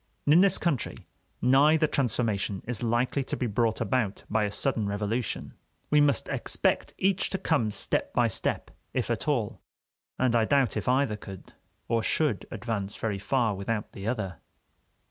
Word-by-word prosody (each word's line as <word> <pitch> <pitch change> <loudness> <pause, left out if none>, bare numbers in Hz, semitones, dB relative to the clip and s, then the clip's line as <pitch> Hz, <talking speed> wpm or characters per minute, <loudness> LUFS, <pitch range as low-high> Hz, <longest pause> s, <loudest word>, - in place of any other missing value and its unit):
In 155 +5 +6
this 195 -1 +5
country, 150 -9 -2 0.4
neither 150 +5 +5
transformation 110 -8 0
is 120 -1 -3
likely 120 +4 +1
to - - -4
be 125 - -1
brought 110 0 0
about 110 -2 0
by 110 -1 +2
a 100 - -3
sudden 110 -1 0
revolution; 105 +3 -2 0.4
we 150 0 +6
must 145 -1 +2
expect - - -1
each 190 0 +2
to 190 - -2
come 145 - +1
step 105 - -1
by - - +3
step, - - -2 0.2
if - - 0
at - - -2
all, - - -1 0.6
and 125 -2 +2
I 115 - +4
doubt 135 -1 +2
if 105 +2 -1
either 130 -4 +2
could 95 -2 -11 0.3
or 115 -1 +1
should 135 -2 0
advance 105 -4 -4
very 105 -3 -2
far 115 +2 +1
without 105 +2 -3
the 100 +2 -7
other. 95 - -3
115 Hz, 165 wpm, -28 LUFS, 105-135 Hz, 0.6 s, In